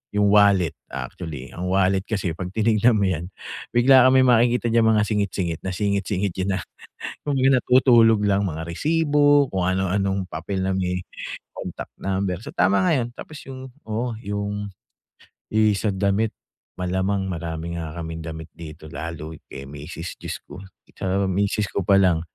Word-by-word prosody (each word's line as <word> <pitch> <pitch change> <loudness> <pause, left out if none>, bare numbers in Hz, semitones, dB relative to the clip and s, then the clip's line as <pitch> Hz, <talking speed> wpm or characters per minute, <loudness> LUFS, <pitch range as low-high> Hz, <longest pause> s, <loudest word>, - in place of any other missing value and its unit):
yung 105 -1 +3
wallet. 100 -6 +5 0.2
Actually 75 -7 -6
ang 90 +1 -4
wallet 95 0 +2
kasi 100 -6 -1
pag 90 +1 -5
tinignan 110 +1 +3
mo - - +2
yan 85 -1 -2 0.5
bigla 130 +1 +7
kang 130 - +4
may 130 - +6
makikita 120 0 +3
diyan 115 0 +4
mga 105 - +3
singit-singit 95 -6 -1
na 95 - -2
singit-singit 100 0 0
diyan 95 0 -1
na - - -3 0.7
kumbaga 135 -2 +3
natutulog 120 -4 +5
lang 100 0 +2
mga 80 -2 -4
resibo, 145 - +3
kung 95 -1 -1
ano 95 0 0
anong 95 0 0
papel 95 +5 -3
na 95 - 0
may 90 -1 -1 0.5
contact - - -7
number. 95 -2 -1
So - - -7
tama 100 - +3
nga 175 - +3
'yon. 120 -1 -1
Tapos 155 - -9
yung, 130 0 -8 0.2
oo, 115 +2 -2
yung 105 0 -3 1.1
sa 100 -1 0
damit 100 +3 0 0.5
malamang 95 +2 -1
marami 85 0 -4
nga 80 -2 -5
kaming 80 0 -5
damit 80 0 -7
dito 80 -1 -10
lalo 80 -1 -6 0.2
kay 70 - -8
misis, 75 +4 -7
Diyos - - -6
ko, - - -11 0.4
sa 95 +1 0
misis 100 +2 0
ko 100 - -2
pa 100 0 +5
lang 90 -4 +3
100 Hz, 160 wpm, -23 LUFS, 90-110 Hz, 1.1 s, bigla